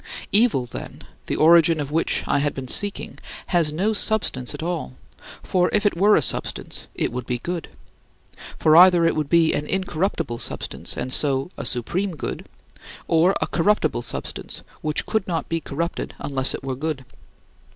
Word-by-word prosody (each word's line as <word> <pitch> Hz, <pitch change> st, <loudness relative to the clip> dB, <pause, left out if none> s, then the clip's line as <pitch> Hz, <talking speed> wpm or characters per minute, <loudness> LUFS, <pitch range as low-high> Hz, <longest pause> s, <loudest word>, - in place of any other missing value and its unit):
Evil, 205 Hz, -, +4 dB
then, -, -, -9 dB, 0.2 s
the -, -, -1 dB
origin 165 Hz, 0 st, +5 dB
of 145 Hz, -1 st, -4 dB
which 165 Hz, +2 st, 0 dB
I -, -, +1 dB
had 145 Hz, 0 st, -1 dB
been 135 Hz, -1 st, -6 dB
seeking, 205 Hz, +8 st, +2 dB, 0.3 s
has 165 Hz, -4 st, +3 dB
no 195 Hz, +8 st, 0 dB
substance 205 Hz, -, 0 dB
at -, -, -7 dB
all; 170 Hz, -, -3 dB, 0.5 s
for 180 Hz, -1 st, +1 dB
if 210 Hz, 0 st, +2 dB
it 205 Hz, -, +2 dB
were 205 Hz, +4 st, +5 dB
a 150 Hz, -, +3 dB
substance, -, -, -3 dB
it -, -, -1 dB
would 125 Hz, 0 st, -5 dB
be 125 Hz, -, -1 dB
good. 170 Hz, +6 st, -5 dB, 0.9 s
For 155 Hz, 0 st, +4 dB
either 175 Hz, -1 st, +7 dB
it 165 Hz, -, +2 dB
would 150 Hz, -2 st, -2 dB
be 165 Hz, -1 st, +4 dB
an 150 Hz, -, -2 dB
incorruptible 185 Hz, -, -2 dB
substance -, -, -3 dB
and 130 Hz, -, -1 dB
so 140 Hz, +2 st, +2 dB
a -, -, -6 dB
supreme 175 Hz, -, -2 dB
good, -, -, -6 dB, 0.6 s
or 170 Hz, +4 st, +3 dB
a -, -, +2 dB
corruptible 165 Hz, -7 st, +1 dB
substance, 120 Hz, -, -5 dB, 0.2 s
which 155 Hz, -1 st, -1 dB
could 220 Hz, -3 st, -1 dB
not 165 Hz, -4 st, -2 dB
be 165 Hz, 0 st, -2 dB
corrupted 170 Hz, +5 st, -4 dB
unless 135 Hz, -2 st, -1 dB
it -, -, -9 dB
were 135 Hz, -1 st, -3 dB
good. 140 Hz, -1 st, -4 dB
160 Hz, 170 wpm, -22 LUFS, 140-180 Hz, 0.9 s, either